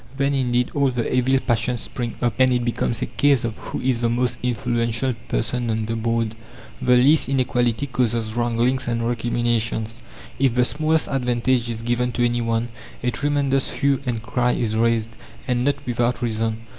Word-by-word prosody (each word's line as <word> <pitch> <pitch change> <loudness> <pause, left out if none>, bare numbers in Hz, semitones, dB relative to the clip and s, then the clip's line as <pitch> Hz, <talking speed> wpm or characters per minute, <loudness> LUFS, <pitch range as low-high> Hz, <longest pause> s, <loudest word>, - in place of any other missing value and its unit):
Then 140 0 +1
indeed 125 -2 +1
all 140 -1 +2
the 120 -2 -2
evil 130 +1 +3
passions 120 0 0
spring 120 -2 -4
up, 120 - +2
and 130 0 +5
it 125 -1 +1
becomes 120 -1 -1
a - - 0
case 140 -4 +2
of 115 -2 -2
who - - -6
is 130 -2 +1
the 120 -1 +1
most 120 +1 0
influential 120 0 0
person 120 +1 -1
on 110 -1 -1
the 115 +1 -2
board. 115 -1 -1 0.5
The 125 -1 +4
least 135 +4 +4
inequality 125 -1 +1
causes 115 -4 -1
wranglings 120 +2 0
and 115 -1 0
recriminations. 115 -2 -1 0.5
If 130 -3 +2
the 125 0 +4
smallest 155 +3 +1
advantage 125 -2 0
is 115 -1 -4
given 120 +1 0
to 120 - +1
any 120 0 0
one, 115 0 -1 0.3
a 125 - +1
tremendous 140 -1 0
hue 140 -2 +1
and 115 -3 -2
cry 125 +1 +1
is 110 -2 -1
raised 115 0 +1 0.4
and 125 -1 +1
not 140 +2 +2
without 120 0 0
reason. 110 -1 -1
120 Hz, 180 wpm, -22 LUFS, 115-130 Hz, 0.5 s, and